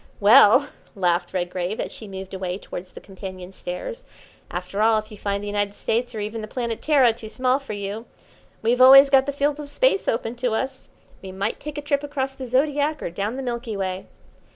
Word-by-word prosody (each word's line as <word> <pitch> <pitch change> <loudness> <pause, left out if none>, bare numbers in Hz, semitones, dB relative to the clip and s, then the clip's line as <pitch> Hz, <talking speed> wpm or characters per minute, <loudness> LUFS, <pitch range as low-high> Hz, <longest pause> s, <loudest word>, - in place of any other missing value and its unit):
"Well," 235 +5 +7 0.3
laughed 175 -2 0
Redgrave, 180 +2 -3
as - - -3
she 220 - -10
moved 190 -1 -8
away 185 -1 -3
towards 180 -2 -9
the - - -9
companion 190 -1 -9
stairs, 460 - -6 0.5
"after 180 +3 -4
all, 220 0 +4
if 215 +1 -5
you 210 - -10
find 200 0 -2
the - - -5
United 205 0 -1
States, 240 +1 -2
or - - -3
even 215 +2 -4
the 215 - -6
Planet 235 -1 -4
Terra, 270 -7 +4
too 220 -1 -10
small 255 +3 +1
for 275 -6 -7
you, 205 +3 -5 0.6
we've 240 +3 +2
always 275 +2 +9
got 270 0 +5
the - - 0
fields 285 +1 0
of 290 -1 -6
Space - - +2
open 230 0 -1
to 245 -2 -1
us. 265 +3 -3 0.3
We 190 - -8
might 195 +3 -3
take 300 0 -7
a 295 - -4
trip 285 -1 0
across 275 -2 -2
the 265 -1 -7
Zodiac 290 +4 +1
or - - -3
down 205 +6 -3
the 270 - -4
Milky 235 -3 -4
Way." 190 -1 -3
225 Hz, 210 wpm, -23 LUFS, 195-270 Hz, 0.6 s, always